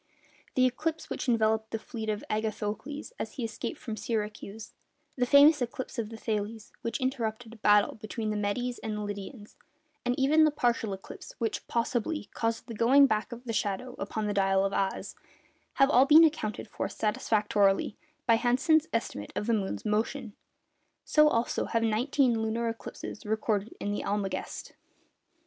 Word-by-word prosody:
the 255 - +5
eclipse 315 +6 -2
which - - -2
enveloped 220 -1 +2
the 225 - -2
fleet 220 0 -6
of 210 -1 -2
Agathocles 220 - -3
as - - -4
he 255 - -5
escaped 225 -1 -4
from 225 -3 -5
Syracuse; 215 -1 -4 0.4
the 250 -1 +1
famous 285 +2 +7
eclipse 255 0 -4
of 220 -2 -2
Thales, 220 -1 -4
which 230 - -3
interrupted 235 -3 -2
a - - -12
battle 210 -1 +4
between 215 0 -4
the - - -2
Medes 240 +4 -2
and 210 -1 -4
Lydians; 205 +2 -8 0.5
and 245 0 0
even 300 +4 +5
the 310 - +6
partial 240 -7 0
eclipse 190 - -9
which 225 -1 -3
(possibly) 235 +2 -1
caused 225 0 -1
the 235 - -7
'going 255 +6 +6
back 215 -2 0
of 240 +1 -8
the 235 -2 -4
shadow 210 +4 -2
upon 210 +2 -3
the 205 - -1
dial 195 -1 +3
of 195 - -1
Ahaz'—have 195 +6 -2
all 260 +1 +6
been 310 +3 +9
accounted 285 -11 0
for - - -4
satisfactorily 210 -2 +1 0.3
by 230 -2 +5
Hansen's 280 +7 +3
estimate 105 - -3
of - - -2
the 235 - +1
moon's 200 -1 -2
motion: 220 +2 -1 0.7
so 305 0 +5
also 230 -5 +1
have 230 0 0
nineteen 235 +2 +2
lunar 225 +1 -1
eclipses 225 -1 -7
recorded 215 0 -1
in 205 - -2
the 205 - -2
Almagest. 200 -1 -3
225 Hz, 160 wpm, -29 LUFS, 210-250 Hz, 0.7 s, been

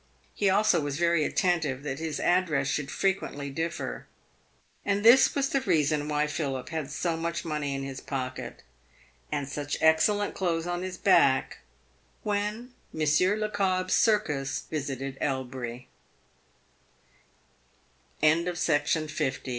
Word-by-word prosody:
He 200 - +1
also 200 -3 +3
was 145 -1 -3
very 170 -2 +2
attentive 155 -7 0
that 140 -1 -4
his 160 -2 -3
address 170 -7 +2
should 140 0 -2
frequently 145 -6 -2
differ. 165 +4 -4 0.8
And 205 +1 0
this 240 +4 +7
was 275 -1 +1
the 275 - +1
reason 155 - +1
why 150 0 +1
Philip 140 -4 -3
had 160 -4 -4
so 170 -2 -1
much 170 +1 -3
money 150 -3 -2
in 135 - -4
his 135 -1 -6
pocket, 130 -2 -5 0.7
and 145 -2 -2
such 145 +1 -3
excellent 200 +6 +3
clothes 170 -3 -1
on 175 0 -2
his 185 0 -5
back, - - +3 0.8
when 220 +5 -5 0.2
Monsieur 160 +6 +2
Le 195 -4 0
C 220 -2 +5
165 Hz, 110 wpm, -28 LUFS, 145-190 Hz, 0.8 s, this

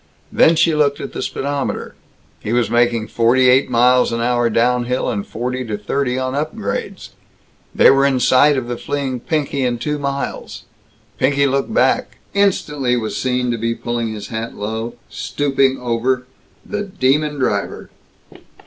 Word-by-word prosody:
Then 165 - +5
she 165 0 +3
looked 145 -2 +1
at - - -7
the - - -4
speedometer. 140 0 -3 0.5
He 105 - -4
was 120 -1 +1
making 120 -2 +2
forty 125 +3 +3
eight 130 +2 +4
miles 125 +1 +4
an 115 - -2
hour 120 0 +1
down 120 +2 +2
hill 125 +1 -1
and 100 -3 -3
forty 125 +2 -3
to 105 -2 -3
thirty 125 +5 -1
on 130 0 -2
upgrades. 140 -9 -4 0.7
They - - +7
were 135 0 +3
in 135 -2 +1
sight 140 +3 +4
of 125 -2 -3
the 120 0 -3
fleeing 135 -2 -3
Pinky 140 0 -1
in 120 -1 0
two 150 +5 -3
miles. 140 0 -4 0.6
Pinky 140 +1 +2
looked 135 +7 0
back; - - +1 0.2
instantly 150 -10 +1
was 110 -2 -3
to 125 -2 0
be 115 +1 -1
seen - - -20
pulling 120 -1 -2
his 105 -2 -7
hat 115 +1 -5
low, 110 +3 -4
stooping 135 -2 0
over 125 +1 -1 0.4
the 210 0 -3
demon 150 -6 0
driver. 105 -7 -2
125 Hz, 160 wpm, -18 LUFS, 120-140 Hz, 0.7 s, They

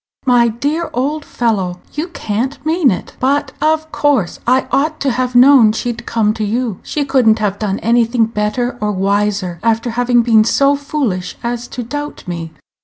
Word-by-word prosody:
My 245 -2 +4
dear 290 +9 -2
old 290 +4 -1
fellow, 195 -9 -1
you 305 +4 -3
can't 265 - -4
mean 320 -2 +3
it. 185 - -4
But, 280 +1 0
of 315 +1 +1
course, 270 -12 0
I 255 +2 +3
ought 300 +4 0
to 275 - +1
have 250 +1 -2
known 245 -3 +7
she'd 235 +1 -4
come 215 -2 +1
to 220 - -4
you. 225 -1 -2
She 295 -2 -3
could 265 -4 +2
n't 220 0 +5
have 205 -2 -2
done 205 -2 -1
anything 235 0 +2
better 230 +3 -2
or 210 0 0
wiser, 200 -2 -1
after 230 +1 0
having 245 0 +2
been 225 -2 +5
so 275 +5 +3
foolish 275 -10 -3
as 240 0 -3
to 250 - -6
doubt 290 0 -6
me." 165 -2 -5
240 Hz, 180 wpm, -16 LUFS, 215-275 Hz, -, known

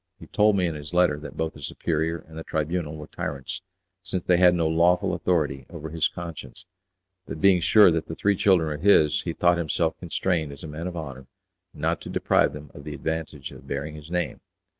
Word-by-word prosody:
He - - -11
told 105 0 +3
me 90 - +2
in 85 - -1
his 75 +2 -8
letter 90 -5 +3
that 75 - -9
both 80 0 -1
the 75 - -13
superior 80 +3 -1
and 80 - -13
the 80 - -6
Tribunal 80 0 -2
were 75 - -8
tyrants, 70 +6 -5 0.4
since 95 -2 -3
they 90 - +3
had 90 0 +6
no 85 -2 +1
lawful 85 +2 +3
authority 75 -7 0
over 80 +1 -7
his 80 -1 +2
conscience: 85 -2 -9 0.6
that - - -6
being 95 -1 +5
sure 105 +1 +7
that 80 -1 -1
the 80 - -5
three 100 +3 +2
children 95 -5 +3
were 75 - -3
his, 80 -3 +4
he 85 - -3
thought 85 +1 +3
himself 80 0 0
constrained 85 -2 -1
as 70 - -11
a - - -6
man 80 +3 -5
of 90 -1 -5
honour 65 -4 -7 0.4
not - - -2
to - - -8
deprive - - +2
them 75 -1 -10
of 70 - -11
the 75 +1 -6
advantage 80 -3 -4
of - - -13
bearing 70 +2 -4
his 75 0 -11
name. 90 0 -2
80 Hz, 215 wpm, -25 LUFS, 75-90 Hz, 0.6 s, sure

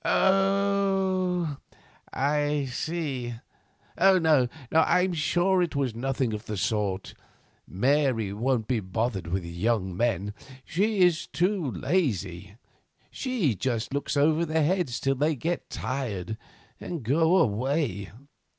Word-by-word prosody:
"Oh! 195 -4 +2 0.5
I 145 +1 0
see. 135 -5 -3 0.6
No, 165 -8 +5 0.2
I 160 +3 +4
am 185 0 0
sure 175 +4 +2
it 170 -4 -1
was 135 -4 0
nothing 130 0 -1
of 105 +1 -6
that 105 - -3
sort. 100 -1 -1 0.5
Mary 125 -1 +1
won't 115 +1 0
be 125 -3 +1
bothered 100 -1 -2
with 90 +1 -2
young 95 +2 -1
men. 105 -2 0 0.3
She 200 +4 0
is 175 -3 +3
too 180 -4 0
lazy; 100 - -1 0.6
she 240 - 0
just 115 +3 -2
looks 140 +1 -2
over 155 +3 +3
their 160 -1 +1
heads 170 -7 0
till 135 - +1
they 150 +4 +1
get 165 +6 -3
tired 110 -7 -3 0.4
and 170 -7 -5
go 160 +9 +3
away. 125 - 0
140 Hz, 120 wpm, -27 LUFS, 110-175 Hz, 0.6 s, No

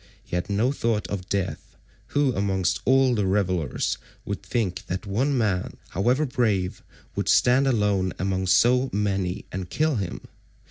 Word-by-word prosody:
He - - -5
had 90 +2 -2
no 110 +6 +2
thought 115 -6 0
of 95 -2 -5
death—who 130 +7 -2
amongst 95 -3 0
all 130 0 +4
the 105 -4 +1
revellers 90 -7 0 0.3
would - - -4
think 100 -7 -2
that 90 +4 -3
one 130 +8 0
man, 100 -6 0
however 125 - +1
brave, 110 -8 0 0.3
would - - -1
stand 130 +3 +4
alone 105 -6 +1
among 95 0 -1
so 125 +8 +4
many 95 -3 -1
and 95 -1 -5
kill 155 -4 +1
him? 95 -4 -4
100 Hz, 145 wpm, -25 LUFS, 95-125 Hz, 0.3 s, all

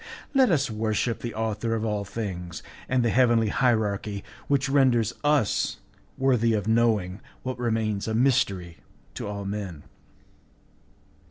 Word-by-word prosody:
Let 265 -3 +5
us 145 -7 +1
worship 110 +2 -1
the 120 - -5
Author 110 +1 -1
of 110 0 -2
all 105 -2 -1
things, 95 -5 -5 0.3
and 130 -2 +2
the 115 - +2
heavenly 120 -3 +4
hierarchy 105 -4 0 0.2
which 140 -1 +2
renders 130 -5 +3
us 145 -8 +2 0.4
worthy 125 -4 +3
of 105 -1 -2
knowing 110 -5 +2 0.2
what 130 -1 -4
remains 110 -4 -1
a 110 - -1
mystery 100 - +1 0.4
to - - -5
all 100 -1 -5
men. 100 -6 -5
110 Hz, 135 wpm, -26 LUFS, 100-125 Hz, 0.4 s, Let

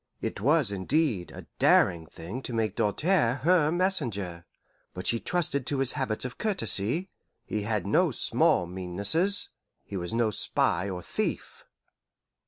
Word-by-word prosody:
It - - -4
was, 140 -2 +3
indeed, 100 - 0
a - - -11
daring 85 -3 +3
thing 95 - -8
to 125 - -6
make 110 -3 -1
Doltaire 130 - +1
her 165 -2 +4
messenger. 115 - -1 0.5
But 90 - -6
she 115 - +1
trusted 140 -6 -1
to 145 - -1
his 135 -1 +3
habits 130 -5 -2
of 125 - -7
courtesy; 155 - 0 0.3
he 105 - -3
had 105 -2 -2
no - - +3
small 90 - +2
meannesses 100 - +1 0.4
he 100 - -6
was 85 -1 -3
no 115 -1 +1
spy 90 -2 0
or 90 -2 -6
thief. - - -4
115 Hz, 145 wpm, -27 LUFS, 95-150 Hz, 0.5 s, her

